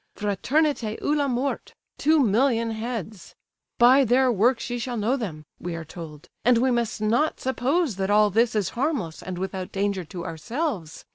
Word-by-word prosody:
Fraternité 225 - 0
ou 295 - 0
la 290 -1 +1
Mort; 260 +2 -2 0.2
two 310 +1 +4
million 230 -1 +2
heads. 220 -4 -6 0.4
'By 255 +3 +6
their 255 +1 +3
works 235 +4 +2
ye 245 - -2
shall 240 0 -3
know 225 +5 +1
them'—we 175 - -6
are 165 -1 -6
told. 155 -3 -10 0.2
And 245 0 +5
we 255 +2 +2
must 235 -3 -1
not 235 +9 +1
suppose 260 - 0
that 190 0 -1
all 210 0 +4
this 225 +3 +2
is 205 -5 +1
harmless 245 - -2
and 185 -1 -6
without 190 0 -4
danger 195 -1 -1
to 170 +2 -7
ourselves. 185 - -4
230 Hz, 165 wpm, -25 LUFS, 190-260 Hz, 0.4 s, By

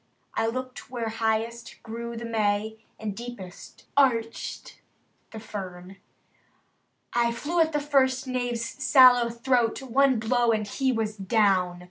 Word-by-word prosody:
I 225 - 0
looked 255 +2 -5
where 235 -3 -3
highest 225 +1 -2
grew 235 +1 -6
the 235 - -5
May, 220 -1 -1 0.2
And 210 -2 -4
deepest 235 -6 -10
arched 230 -5 0 0.5
the 220 - -8
fern. 190 -3 -8 1.2
I 235 0 +2
flew 300 +9 -2
at 320 -1 +3
the 295 - 0
first 270 -3 +2
knave's 245 -2 -2
sallow 255 -2 +5
throat. 235 0 +1
One 265 0 +3
blow, 235 +2 +2
and 215 -1 -1
he 260 +6 0
was 220 -3 -2
down. 195 -3 +2
235 Hz, 130 wpm, -26 LUFS, 220-255 Hz, 1.2 s, sallow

